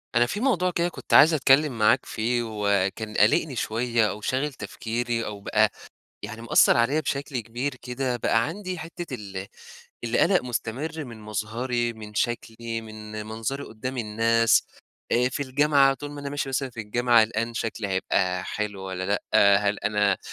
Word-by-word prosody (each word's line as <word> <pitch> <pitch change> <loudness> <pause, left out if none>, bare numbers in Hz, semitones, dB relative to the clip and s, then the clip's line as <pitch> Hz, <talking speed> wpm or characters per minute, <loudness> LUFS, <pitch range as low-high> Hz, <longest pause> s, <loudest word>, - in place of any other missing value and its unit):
أنا 120 0 +5
في 205 - -4
موضوع 190 -8 +1
كده 170 0 0
كنت - - -7
عايز 160 +3 +8
أتكلّم 140 -2 +3
معاك 110 0 +4
فيه، 120 +2 -1
وكان 105 -1 -1
قالقني 135 +7 +3
شويّة 115 -1 +1
أو 105 - -6
شاغل 135 +6 -1
تفكيري 115 +2 -3
أو 105 -1 -6
بقى - - +2 0.5
يعني 115 +1 -7
مأثّر 115 - +5
عليَّ 125 +6 +2
بشكل 140 -3 -3
كبير 120 +5 -4
كده، 125 0 -3
بقى 115 -1 +2
عندي 185 +1 -5
حتّة 165 -2 -7
ال 100 -4 -6 0.6
القلق 170 +11 +3
مستمر 130 +6 -4
من 115 -4 -10
مظهري، 120 +3 -2
من 105 -2 -11
شكلي، 115 0 -2
من 110 -1 -8
منظري 115 +6 -4
قدّام 130 +4 -6
الناس، 115 +1 +3 0.5
آآ، 125 +1 +3
في 135 +2 -3
الجامعة 140 0 +3
طول 145 +1 -8
ما 145 - -7
أنا 140 0 -5
ماشي 145 -1 -2
مثلًا 135 0 -2
في 115 - -7
الجامعة، 120 +2 +3
قلقان 115 +1 -3
شكلي 110 -2 -3
هيبقى 95 -1 0
حلو 105 -2 -4
والّا 95 -1 -4
لأ، 100 +1 0 0.4
هل 105 0 0
أنا 105 -2 +1
115 Hz, 160 wpm, -25 LUFS, 110-135 Hz, 0.6 s, عايز